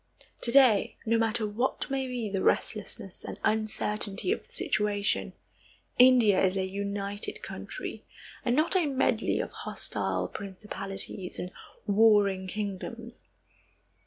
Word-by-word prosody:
To 235 - +2
day, 255 -7 +5
no 230 0 +2
matter 225 0 +1
what 220 +5 -1
may 270 -1 -1
be 245 -3 -3
the 195 -2 -2
restlessness 210 -2 -1
and - - -7
uncertainty 215 - 0
of 440 - -2
the - - -23
situation, 210 - 0 0.7
India 245 -7 +6
is 190 +1 +2
a 190 - 0
united 200 +1 -3
country, - - -6 0.4
and 240 -1 +1
not 315 +6 +2
a 355 -5 +3
medley 260 -4 +1
of - - -3
hostile - - -3
principalities 195 -1 -5
and 180 - -5 0.3
warring 205 -3 +4
kingdoms. 215 +4 -5
210 Hz, 125 wpm, -29 LUFS, 200-240 Hz, 0.7 s, India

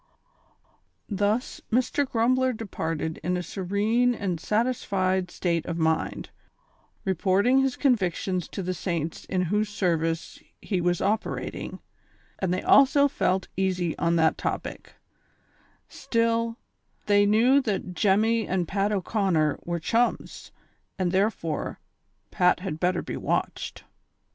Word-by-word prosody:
Thus, 210 +4 -1
Mr. 255 +3 +1
Grumbler 255 +3 +2
departed 165 -7 -4
in 180 +2 -1
a 180 - -3
serene 210 +7 +1
and 185 -6 -2
satisfied 195 -5 0
state 170 -2 -1
of 170 - -3
mind, 160 -1 -1 0.7
reporting 195 +7 +3
his 270 -1 +1
convictions 185 - 0
to 195 - -5
the 185 +1 -2
saints 165 -2 -3
in 185 -1 0
whose 210 0 +1
service 165 -5 -1 0.2
he 190 -4 -2
was 175 0 +1
operating, 215 +2 -2 0.6
and 190 -2 0
they 185 - -1
also 280 +1 +6
felt 190 -8 0
easy 185 -3 0
on 170 0 +2
that 160 -1 +2
topic; - - -4 0.9
still, 230 0 0 0.5
they 205 0 +4
knew 240 +7 +5
that 200 -6 -3
Jemmy 215 +4 +2
and 180 -2 -1
Pat 200 +3 0
O'Conner 190 -6 +1
were 170 0 -2
chmus, 230 +9 -1 0.5
and 185 -3 0
therefore 190 -5 -1 0.5
Pat 180 0 +3
had 170 -5 -4
better 180 0 +1
be - - -5
watched. - - -2
190 Hz, 120 wpm, -26 LUFS, 175-225 Hz, 0.9 s, also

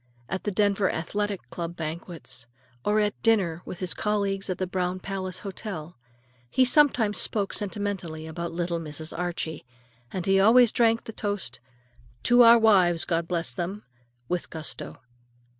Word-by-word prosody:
At 190 - -4
the 205 - 0
Denver 200 0 +2
Athletic 205 +4 -3
Club 170 0 -5
banquets, 160 -7 -5 0.4
or 210 +1 +2
at 210 -1 -1
dinner 190 -8 +2
with - - -7
his 185 0 -1
colleagues 200 -2 -1
at 185 - -1
the 185 - -1
Brown 180 0 -2
Palace 185 -1 -4
Hotel, 185 -5 -6 0.5
he 255 - +4
sometimes 250 -6 +4
spoke 200 -3 +1
sentimentally 195 -6 -3
about 170 +1 -5
"little 170 0 -2
Mrs. 155 0 -6
Archie," 175 -2 -3 0.5
and 185 -2 -3
he 195 0 +4
always 230 +3 +6
drank 230 -1 +3
the 225 - -8
toast 205 - -3 0.6
"to 245 +1 +6
our 235 0 +9
wives, 185 -7 +4
God 165 -1 -1
bless 170 -8 -1
them!" 190 +8 -4 0.4
with 180 -1 -2
gusto. 160 -1 -5
190 Hz, 150 wpm, -26 LUFS, 170-210 Hz, 0.6 s, our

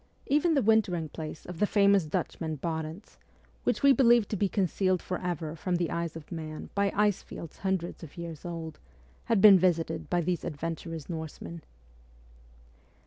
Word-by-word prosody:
Even 305 +3 +3
the 275 - +3
wintering 195 -7 +2
place 155 0 -7
of 175 -2 -8
the 210 - +3
famous 200 -3 +4
Dutchman 155 +1 -2
Barentz, 160 +5 -5 0.5
which - - 0
we 280 -1 +8
believed 240 -5 +5
to - - -1
be 200 0 +1
concealed 185 -1 +1
for 180 - -4
ever 165 -3 -3
from 180 +1 -1
the 175 -1 -1
eyes 170 -1 -2
of 165 0 -10
man 155 -2 -6
by 200 -1 +1
ice 210 -2 +2
fields 165 - -10
hundreds 190 -3 -2
of 165 -1 -11
years 170 -3 -7
old, 165 -2 -6 0.5
had 225 -4 +2
been 200 -3 +9
visited 170 -2 0
by 175 -1 +2
these 175 0 -1
adventurous 165 0 -5
Norsemen. 165 0 -6
175 Hz, 165 wpm, -29 LUFS, 160-200 Hz, 0.5 s, been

